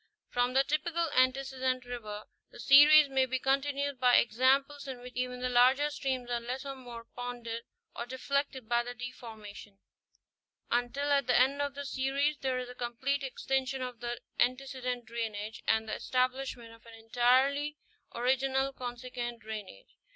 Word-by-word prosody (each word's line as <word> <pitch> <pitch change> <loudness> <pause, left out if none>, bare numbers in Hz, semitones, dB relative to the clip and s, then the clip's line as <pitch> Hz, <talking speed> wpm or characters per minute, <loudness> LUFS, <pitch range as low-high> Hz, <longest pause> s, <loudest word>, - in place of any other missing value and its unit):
From 245 +1 0
the 270 - +5
typical 320 +2 -1
antecedent 255 -1 +1
river, 215 -4 -6 0.3
the - - -14
series 290 +4 +8
may 265 -1 +2
be 260 +1 0
continued 275 +1 0
by 250 -1 +5
examples 270 +5 +2
in 260 -2 -6
which 250 0 -10
even 250 0 -3
the 250 - 0
larger 260 +4 +4
streams 265 -4 -2
are 240 - +1
less 250 +3 -5
or 275 -1 -5
more 240 -3 -10
ponded 240 -2 -5 0.3
or 235 - -5
deflected 260 -1 -2
by 235 +1 +2
the 245 +1 -7
deformation, 220 -5 -9 0.9
until 245 +4 0
at 280 -3 +3
the 250 - +4
end 275 +3 +3
of 285 -1 -2
the 285 0 -5
series 275 +2 0
there 260 -1 -1
is 250 0 -4
a 250 - -9
complete 250 +3 -2
extinction 265 0 -2
of 250 -2 -6
the 240 0 -4 0.2
antecedent 255 -1 -1
drainage 220 -2 -5
and 220 0 +2
the - - -4
establishment 255 -2 -2
of 230 - -18
an 230 - -12
entirely 260 +6 +2 0.4
original 265 +2 +1
consequent 245 -1 -5
drainage. 210 - -9
255 Hz, 160 wpm, -31 LUFS, 240-270 Hz, 0.9 s, series